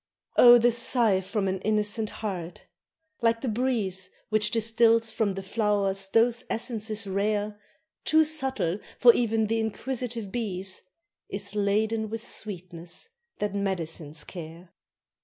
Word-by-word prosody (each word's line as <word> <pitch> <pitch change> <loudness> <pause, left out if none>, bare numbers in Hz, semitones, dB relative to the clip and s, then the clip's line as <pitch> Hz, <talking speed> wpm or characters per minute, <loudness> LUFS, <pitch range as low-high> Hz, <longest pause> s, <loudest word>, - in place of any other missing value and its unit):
Oh! 240 0 +9
the 240 +1 +4
sigh 230 -4 +2
from 195 +1 -2
an 190 0 -1
innocent 215 +1 0
heart 180 -5 -6 0.6
like 230 0 +2
the 265 - -3
breeze 215 -6 0 0.2
Which 215 -1 +2
distils 225 0 +3
from 210 -3 0
the 195 - -5
flowers 195 -2 0
those 230 +3 +2
essences 225 -2 -2
rare, 205 +1 -1 0.4
Too 315 0 +5
subtle 265 - 0 0.2
for 240 -1 +8
e'en 225 -2 +1
the 225 +1 0
inquisitive 230 -1 -3
bees 195 -5 -1 0.5
Is 200 0 -4
laden 215 +2 0
with 225 +1 -4
sweetness 180 - -4 0.3
that 210 -1 -2
medicines 165 -6 -3
care. 170 0 -10
210 Hz, 125 wpm, -27 LUFS, 195-230 Hz, 0.6 s, Oh